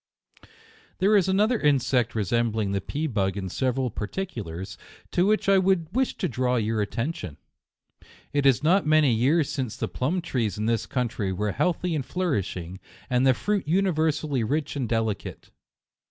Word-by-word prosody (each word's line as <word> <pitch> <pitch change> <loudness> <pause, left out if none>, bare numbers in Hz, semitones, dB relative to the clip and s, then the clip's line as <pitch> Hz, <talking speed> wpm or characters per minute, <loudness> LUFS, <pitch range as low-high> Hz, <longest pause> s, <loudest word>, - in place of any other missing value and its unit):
There 200 +3 +3
is 195 -3 +4
another 210 +5 +2
insect 130 -5 +2
resembling 110 0 0
the 100 - 0
JUNEc - - -16
133 145 - -3
pea 160 - +1
bug 95 -2 0
in 95 -1 -4
several 130 +3 -1
particulars, 100 - -5 0.4
to 180 +2 +2
which 215 -1 +1
I 195 -1 +5
would 185 -3 +1
wish 260 0 0
to - - -1
draw 125 0 0
your 110 -2 0
attention. 105 - -3 1.0
It 145 -1 +3
is 135 +1 +3
not 175 +2 +3
many 155 -4 +4
years 140 +7 +2
since 130 -6 -3
the - - -2
plum 165 +8 -2
trees 115 - -1
in 105 - -2
this 115 -1 0
country 115 -6 -2
were 105 +2 -1
healthy 180 - 0
and 150 -4 -1
flourishing, 100 - -3 0.3
and 125 +1 +3
the 130 - +5
fruit 205 - -1
universally 155 -6 +1
rich 145 +7 -1
and 130 -5 -2
delicate. 110 -4 -3
130 Hz, 170 wpm, -25 LUFS, 110-165 Hz, 1.0 s, I